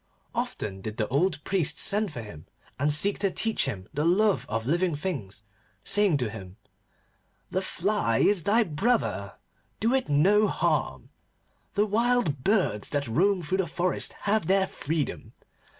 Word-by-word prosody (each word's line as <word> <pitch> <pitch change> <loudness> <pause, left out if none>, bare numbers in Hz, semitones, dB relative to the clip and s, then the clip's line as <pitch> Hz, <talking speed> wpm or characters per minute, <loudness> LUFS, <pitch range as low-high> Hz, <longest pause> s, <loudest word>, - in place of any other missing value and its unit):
Often 95 -2 -4
did 110 +2 -6
the 110 - 0
old 150 +3 0
priest 165 -6 0
send 210 -2 +2
for 120 -6 -7
him, 85 -8 -11 0.3
and 145 +2 +2
seek 195 +8 +3
to 200 -1 +1
teach 225 +4 0
him 100 -9 -5
the 150 0 -1
love 195 +4 +2
of 115 0 -2
living 170 +3 +1
things, 130 - -5 0.4
saying 205 -6 +3
to 125 -5 -1
him: 95 -2 -10 0.9
'The 185 - 0
fly 190 - 0
is 200 -3 +3
thy 215 +7 +3
brother. 160 - -1 0.4
Do 230 +4 +1
it 265 - 0
no 195 +9 +4
harm. - - -1 0.6
The 205 0 +3
wild 215 - +1
birds 185 - +1
that 145 -2 -1
roam 185 - +2
through 185 +5 -1
the 190 - 0
forest 175 +3 -1
have 205 -4 +1
their 195 0 +3
freedom. 155 -4 -4
175 Hz, 155 wpm, -27 LUFS, 135-205 Hz, 0.9 s, no